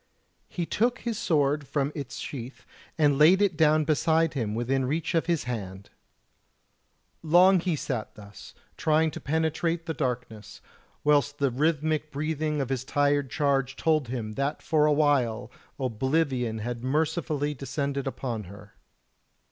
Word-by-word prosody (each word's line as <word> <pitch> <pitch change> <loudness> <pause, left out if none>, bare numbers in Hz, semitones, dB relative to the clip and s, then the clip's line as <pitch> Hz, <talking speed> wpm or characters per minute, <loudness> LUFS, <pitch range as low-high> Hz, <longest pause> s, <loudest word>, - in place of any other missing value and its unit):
He 175 - -3
took 240 +8 +1
his 235 -2 -3
sword 150 - +1
from 140 -1 -1
its 140 -4 -6
sheath 130 -1 -7 0.3
and 145 -3 +3
laid 170 +6 +7
it 200 -4 +2
down 155 0 +4
beside 160 +1 +2
him 110 -6 -2
within 130 +3 0
reach 155 +7 -2
of 165 0 +1
his 170 -3 +1
hand. 100 -5 -6 1.3
Long 180 +4 +5
he 175 -1 -1
sat 125 -6 -4
thus, 100 -1 -13 0.2
trying 155 0 +2
to - - -7
penetrate 160 +2 -1
the 165 - -3
darkness, 125 -6 -4 0.4
whilst 145 -1 +2
the 140 -2 +1
rhythmic 155 +2 0
breathing 150 0 -2
of 135 - -3
his 130 -2 -2
tired 145 0 +1
charge 135 -2 0
told 155 -4 +1
him 115 -3 -4
that 140 +6 -3
for 155 -1 +3
a - - +3
while 145 -7 +1 0.3
oblivion 130 -1 0
had 120 +2 -5
mercifully 150 +1 -1
descended 140 0 -3
upon 120 -5 -4
her. 100 +2 -13
145 Hz, 145 wpm, -27 LUFS, 130-160 Hz, 1.3 s, laid